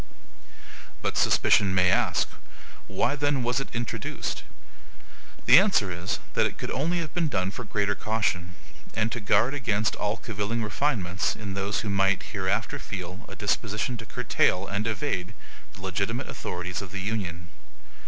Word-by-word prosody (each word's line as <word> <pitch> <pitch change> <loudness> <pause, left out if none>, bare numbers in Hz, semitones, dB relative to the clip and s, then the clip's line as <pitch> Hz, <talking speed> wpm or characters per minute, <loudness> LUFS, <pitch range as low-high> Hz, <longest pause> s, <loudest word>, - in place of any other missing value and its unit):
But - - -1
SUSPICION 100 -3 +4
may 90 0 +5
ask, - - +2 0.6
Why 100 +8 +1
then 145 -2 +1
was 120 +2 +1
it 135 - -4
introduced? 120 -1 -3 1.0
The - - +10
answer 190 - +3
is, 85 +1 -2 0.2
that - - +3
it - - -8
could - - -4
only 165 +7 0
have 155 -3 -6
been 170 -2 +1
done 95 -8 0
for 125 - -6
greater 105 -1 0
caution, 95 -5 -1 0.4
and 110 +1 +1
to 120 - -2
guard 115 +5 +3
against 110 -6 +1
all 105 +2 -1
cavilling 110 +1 -2
refinements 105 -6 0
in 100 -3 -5
those 100 +2 -1
who 105 - -3
might 95 -1 +3
hereafter 105 +7 0
feel 95 -1 -6
a - - -8
disposition 105 +3 0
to 115 -1 -9
curtail 90 +1 +2
and 100 +2 -2
evade 105 -5 -2 0.4
the 95 - -12
legitimate 100 +7 -1
authorities 90 +1 -4
of 95 -2 -8
the 100 -1 -4
Union. 90 -5 -3
105 Hz, 155 wpm, -27 LUFS, 95-120 Hz, 1.0 s, The